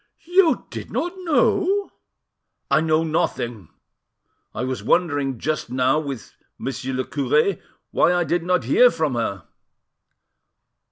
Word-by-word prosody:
"You 365 -3 +4
did - - -7
not 350 +1 -2
know?" 380 +3 +1 0.8
"I 155 - +4
know 160 0 +2
nothing. 120 - -2 0.8
I 110 - -4
was 130 0 -3
wondering 145 -7 +1
just 155 +4 -2
now 130 +3 +2
with 140 -6 -6 0.2
Monsieur 130 0 -4
le 130 0 -1
cure 150 +6 +1 0.3
why - - +3
I 175 0 +2
did 175 +1 0
not 180 -4 +1
hear 195 - +5
from 155 - -1
her." 100 -6 -2
155 Hz, 125 wpm, -22 LUFS, 130-180 Hz, 0.8 s, hear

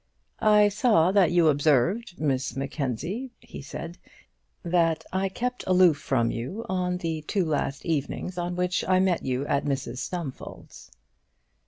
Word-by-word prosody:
"I 210 -1 +5
saw 200 -5 +3
that 195 -4 +4
you 175 -2 +4
observed, 160 - +2
Miss 135 -4 -1
Mackenzie," 140 - -3
he - - -10
said, 165 +5 -8 0.6
"that 165 -2 +1
I 190 +1 0
kept 250 +5 -3
aloof 180 -4 +5
from 120 -4 0
you 135 - -5
on 180 -1 -1
the 165 -3 -3
two 180 +4 -1
last 145 -2 -2
evenings 165 +3 -2
on 175 0 -3
which 180 0 0
I 185 0 +4
met 185 -2 +1
you 130 +1 -1
at 140 - 0
Mrs 135 -3 -3
Stumfold's." 165 -6 -7
170 Hz, 145 wpm, -26 LUFS, 140-185 Hz, 0.6 s, I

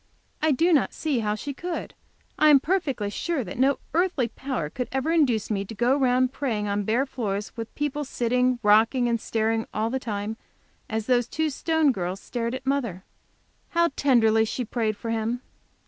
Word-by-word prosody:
I 310 0 +3
do 335 +6 +3
not 290 - +2
see 295 -6 0
how 210 -1 0
she 280 +6 -5
could. 345 +5 -5 0.5
I 305 - +6
am 285 -2 +8
perfectly 275 - -1
sure 325 +3 -2
that 190 +3 -8
no 270 +1 +3 0.2
earthly 330 -8 +1
power 255 - -3
could 250 +11 -4
ever 265 +4 0
induce 255 -11 +2
me 200 -2 0
to 225 - -9
go 240 +5 +3
round 255 -1 +2
praying 225 -8 -2
on 205 0 -1
bare 235 +6 +2
floors, 210 -6 -4
with 230 -1 -7
people 295 0 -2
sitting, 250 -1 +1
rocking 225 +4 +4
and 230 -1 0
staring 225 0 0
all 220 +2 0
the 265 - -1
time, 215 -2 -4 0.5
as 220 -1 -2
the 245 0 +3
two 310 +6 -2
Stone 320 0 +2
girls 185 -3 -3
stared 235 +3 -3
at 260 - -7
mother. 240 -10 -1 0.7
How 340 0 +3
tenderly 225 -5 +4
she 240 +3 -3
prayed 220 -2 -1
for 230 - -4
him! 230 +2 -1
245 Hz, 185 wpm, -25 LUFS, 220-280 Hz, 0.7 s, am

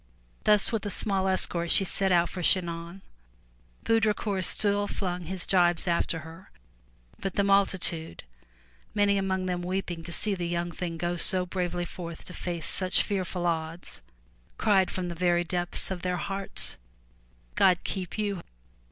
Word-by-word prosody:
Thus 210 -2 +5
with 225 -2 -1
a - - -2
small 195 -1 0
escort 175 -2 +1
she 195 - +5
set 195 0 0
out 175 -1 +4
for 180 - -6
Chinon. 170 +1 0 0.8
Baudricourt 210 -3 +1
still 205 -1 0
flung 180 -3 -3
his 185 +1 -3
jibes 175 -2 +3
after 170 -1 0
her, 165 +5 -12 0.7
but 195 -1 -4
the 200 - +2
multi 195 -1 +3
tude, 165 -2 0 0.7
many 200 -1 +3
among 190 -1 -1
them 180 -1 -2
weeping 180 -1 -3
to 165 - -8
see 205 +4 +2
the 175 -3 -3
young 175 0 -2
thing 170 -1 -5
go 175 +1 -2
so 185 +1 +2
bravely 175 -1 -2
forth 170 -1 -8
to 180 - -7
face 175 -3 -4
such 185 -1 +2
fearful 185 -3 -2
odds, 165 0 -3 0.6
cried 195 -4 +3
from 185 -1 -3
the 175 - -4
very 175 0 +2
depths 175 +2 +2
of 180 -2 -4
their 180 0 -1
hearts, 195 +4 -1 0.8
'*God 185 -2 +5
keep 185 -1 -4
you! 200 -4 -2
180 Hz, 160 wpm, -28 LUFS, 175-195 Hz, 0.8 s, Thus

